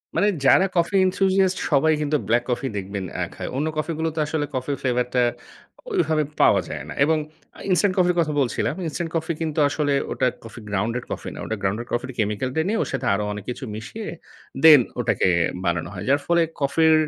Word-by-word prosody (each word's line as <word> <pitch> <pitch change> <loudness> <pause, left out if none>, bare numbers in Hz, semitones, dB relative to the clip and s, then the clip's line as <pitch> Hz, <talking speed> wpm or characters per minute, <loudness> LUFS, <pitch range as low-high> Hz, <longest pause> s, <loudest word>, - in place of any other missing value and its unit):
মানে। 185 +5 +3 0.2
যারা 190 - +6
coffee 170 +3 +1
enthusiast 190 0 +2
সবাই 155 +2 +4
কিন্তু 150 0 +1
ব্লাক 120 +2 +2
কফি 125 +2 -1
দেখবেন 100 0 -4
অ্যা - - -1
খায়। - - -6
অন্য 150 +3 0
কফি 155 +2 -1
গুলো 160 0 0
তো - - -2
আসলে 150 0 -1
কফি 130 +2 -2
ফ্লেভার 125 -1 +1
টা 125 - +3 0.7
ওইভাবে 160 - +1 0.2
পাওয়া - - +5
যায় - - -5
না। - - -5
এবং 160 +2 +3 0.4
আ - - -13
ইনস্টান্ট 185 +2 +3
কফির 180 -1 +3
কথা 155 -2 +1
বলছিলাম। 130 - -1
ইনস্টান্ট 165 +3 -3
কফি 160 +1 -1
কিন্তু, 155 -1 -1
আসলে 145 0 0 0.2
ওটা - - +1 0.2
কফি 115 +1 -10
গ্রাউন্ডেড 110 +5 -1
কফি - - -5
না। - - -9
ওটা 110 - -2
গ্রাউন্ডেড 105 +5 -2
কফির 130 +2 -2
কেমিক্যাল 105 +4 0
টা 160 - +1
নিয়ে, 220 - 0
ওর - - -6
সাথে 135 - -2
আরো 105 +1 0
অনেক 105 -2 -7
কিছু 125 +3 -5
মিশিয়ে, 205 - -7 0.6
দেন 155 -5 +10 0.2
ওটাকে - - +1 0.4
বানানো 85 -1 -1
হয়। 90 - -6
যার 140 - +4
ফলে 170 0 +3 0.2
কফির, 160 +3 +4
145 Hz, 200 wpm, -23 LUFS, 120-165 Hz, 0.7 s, দেন